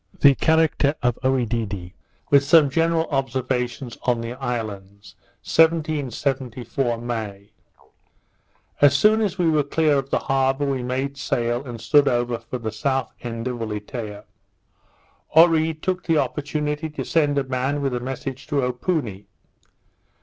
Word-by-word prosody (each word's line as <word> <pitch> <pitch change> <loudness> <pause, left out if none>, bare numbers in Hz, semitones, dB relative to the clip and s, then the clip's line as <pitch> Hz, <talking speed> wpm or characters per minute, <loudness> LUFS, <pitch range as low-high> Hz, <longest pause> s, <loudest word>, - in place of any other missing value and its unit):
The 140 -1 +7
Character 155 -1 +2
of 125 -1 +1
Oedidee; 115 -8 -1 0.4
with 140 -1 +6
some 145 -1 +5
general 165 +2 +2
Observations 130 -2 -2
on 125 -2 +1
the 115 +1 -5
Islands._ 100 -5 -6 0.3
1774 135 -6 0
May 110 -4 -5 1.3
As 140 -1 +6
soon 215 +7 +4
as 200 -3 -1
we 175 -3 +2
were 155 -2 +3
clear 145 0 +2
of 135 0 -6
the - - +1
harbour, 135 +1 +1
we 135 -2 -1
made 130 +3 -3
sail, 120 -1 -1
and 120 -4 -8
stood 145 +4 +4
over 120 -2 0
for 125 - -6
the 110 -2 -4
South 130 +4 -1
end 115 0 -5
of 125 -1 -4
Ulietea. 105 -1 -5 1.1
Oree 160 -1 +5
took 185 +2 -2
the 165 -2 +2
opportunity 150 +3 -2
to 150 - -5
send 145 -3 +1
a 140 - +2
man 130 +2 -1
with 135 -2 0
a 125 - -1
message 135 +1 -6
to 145 -3 0
Opoony. 125 - -2
135 Hz, 140 wpm, -23 LUFS, 120-150 Hz, 1.3 s, The